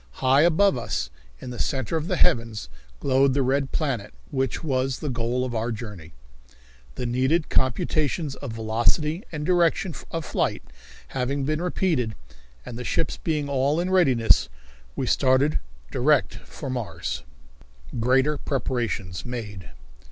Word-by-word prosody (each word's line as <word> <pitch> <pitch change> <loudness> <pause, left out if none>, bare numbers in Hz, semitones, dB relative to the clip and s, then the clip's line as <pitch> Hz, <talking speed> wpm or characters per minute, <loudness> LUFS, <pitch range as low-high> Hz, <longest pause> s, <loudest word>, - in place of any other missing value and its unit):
High 130 - +4
above 170 -2 +4
us, 65 - -2 0.3
in 125 - -7
the 120 - -7
centre 135 +1 -1
of 160 0 -1
the 180 - +1
heavens, 115 - +1 0.3
glowed 135 - +3
the 140 - +3
red 135 +1 +1
planet 125 - -2 0.2
which 135 +1 -1
was 130 -3 0
the 150 - -3
goal 120 +1 0
of 125 - -4
our 115 +1 -1
journey. 105 -9 -7 0.8
The - - -3
needed 130 +7 +1
computations 150 +2 +1
of 135 -6 -6
velocity 120 - +1
and 150 -2 -4
direction 175 0 +2 0.2
of 165 -1 -3
flight - - -1 0.5
having 135 +2 -1
been 155 +3 0
repeated, 160 - 0 0.5
and 115 - -7
the - - -4
ships 160 - -1
being 150 -3 -1
all 140 +3 +1
in 180 +2 -1
readiness, 130 - +4 0.5
we - - -1
started 130 +3 +3 0.3
direct 145 +2 +3
for 135 -4 -7
Mars. 85 - -3 0.8
Greater 130 +5 +3
Preparations 115 - -2
Made. 105 -8 -6
130 Hz, 140 wpm, -25 LUFS, 115-150 Hz, 0.8 s, High